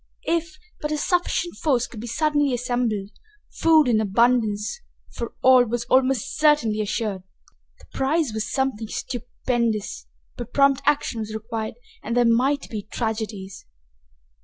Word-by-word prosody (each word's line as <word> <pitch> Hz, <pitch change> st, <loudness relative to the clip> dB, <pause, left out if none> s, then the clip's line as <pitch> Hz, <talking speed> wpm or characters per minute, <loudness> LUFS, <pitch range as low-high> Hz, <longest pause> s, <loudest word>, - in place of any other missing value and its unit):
If 330 Hz, -2 st, -1 dB, 0.2 s
but 300 Hz, -, -2 dB
a 305 Hz, -, 0 dB
sufficient 350 Hz, +1 st, 0 dB
force 255 Hz, -6 st, +1 dB
could 225 Hz, -, -10 dB
be 235 Hz, -, -6 dB
suddenly 290 Hz, 0 st, +1 dB
assembled, 240 Hz, -5 st, -1 dB, 0.4 s
food 315 Hz, -3 st, +4 dB
in 220 Hz, -3 st, +3 dB
abundance 220 Hz, -, +1 dB, 0.3 s
for 235 Hz, -, -6 dB
all 255 Hz, -1 st, +7 dB
was 235 Hz, +1 st, -2 dB
almost 260 Hz, -3 st, +2 dB
certainly 270 Hz, -9 st, +3 dB
assured. 210 Hz, -2 st, -2 dB, 0.6 s
The -, -, -18 dB
prize 275 Hz, -1 st, 0 dB
was 220 Hz, -1 st, -3 dB
something 265 Hz, -5 st, -1 dB
stupendous, 235 Hz, -3 st, -3 dB, 0.3 s
but 240 Hz, -1 st, -7 dB
prompt 275 Hz, -1 st, +4 dB
action 290 Hz, -5 st, +1 dB
was 215 Hz, 0 st, -5 dB
required, 220 Hz, 0 st, -4 dB, 0.3 s
and 235 Hz, +2 st, -2 dB
there 245 Hz, -, +4 dB
might 260 Hz, +5 st, +2 dB
be 215 Hz, -2 st, -3 dB
tragedies. 215 Hz, -, -5 dB
240 Hz, 135 wpm, -23 LUFS, 220-275 Hz, 0.6 s, all